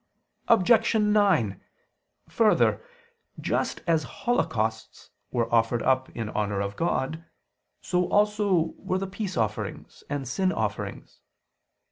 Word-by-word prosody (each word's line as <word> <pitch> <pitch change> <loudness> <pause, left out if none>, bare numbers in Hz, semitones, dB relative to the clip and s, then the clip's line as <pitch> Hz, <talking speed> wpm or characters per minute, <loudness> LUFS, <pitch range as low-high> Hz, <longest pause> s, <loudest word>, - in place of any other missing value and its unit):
Objection 220 0 +4
9: 190 - +2 0.7
Further, 220 -2 +3 0.6
just - - -1
as 165 -3 +2 0.2
holocausts 110 - -1 0.2
were 115 -1 -1
offered 115 0 +2
up 130 0 +2
in 115 -2 -3
honor 105 -2 -1
of 100 0 -3
God, 160 -1 -1 0.6
so 180 -1 0
also 205 -5 +2
were 185 - -1
the 195 - -2
peace 195 0 -5
offerings 110 -3 -3
and 140 -2 -3
sin 185 +9 0
offerings. 105 - -4
160 Hz, 110 wpm, -26 LUFS, -, 0.7 s, Objection